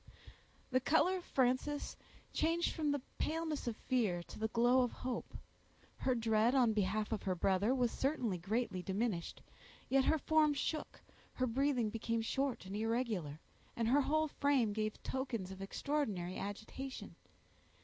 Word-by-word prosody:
The 255 - +4
color 325 +7 +3
of 360 - -8
Frances 260 +3 0 0.4
changed 330 +2 +1
from 305 -3 0
the 285 -3 -1 0.2
paleness 315 -3 -1
of 235 - -1
fear 215 -10 0
to - - -11
the 220 - +1
glow 240 +3 +4
of 245 - +1
hope. 255 -1 -5 0.6
Her 255 - +1
dread 225 +1 +3
on 245 -4 +4
behalf 210 +1 0
of 220 - -1
her 185 -1 -1
brother 195 +7 +2
was 245 -3 +2
certainly 250 - 0
greatly 205 +1 -1
diminished; 195 -2 -2 0.5
yet 270 0 +4
her 320 - +4
form 305 -1 +3
shook, 305 +3 -3 0.3
her 255 - 0
breathing 250 -2 +1
became 230 0 -1
short 270 -1 -1
and 190 +2 -6
irregular, 215 - -1 0.4
and 230 -1 0
her 285 +4 +5
whole 310 +3 +2
frame 275 -7 +2
gave 215 0 -2
tokens 235 -8 -3
of 190 0 -8
extraordinary 195 -5 -2
agitation. 220 +7 -6
240 Hz, 150 wpm, -36 LUFS, 215-275 Hz, 0.6 s, her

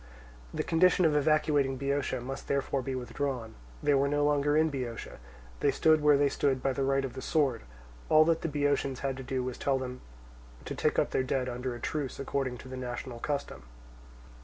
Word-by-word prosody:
The - - -2
condition 180 +2 +4
of 155 -2 +3
evacuating 145 -2 +2
Boeotia 140 -1 -1
must 135 +2 -6
therefore 140 -1 0
be 130 +1 -3
withdrawn. 125 -2 -3 0.3
They 145 - +3
were 140 0 +3
no 145 +1 +1
longer 145 0 +2
in 160 0 +3
Boeotia. 125 - -5 0.4
They - - +3
stood 155 -1 +4
where 150 -1 +5
they 145 0 +3
stood 135 -2 0
by 135 - +1
the 135 - -3
right 135 0 +1
of 130 - -6
the 130 - -6
sword. 135 -8 +1 0.5
All 155 0 +7
that 165 0 +2
the - - -1
Boeotians 145 -2 0
had 135 -1 -1
to - - -6
do 130 0 -2
was 125 -1 -5
to - - -7
tell 135 -1 +2
them 130 -1 -5 0.6
to - - -4
take - - 0
up - - +2
their - - +1
dead 130 0 -1
under 125 0 -3
a - - -8
truce 145 -1 -3
according 135 -2 -2
to 130 - -11
the 130 0 -7
national 125 -1 -5
custom. 140 - -3
135 Hz, 210 wpm, -30 LUFS, 130-145 Hz, 0.6 s, All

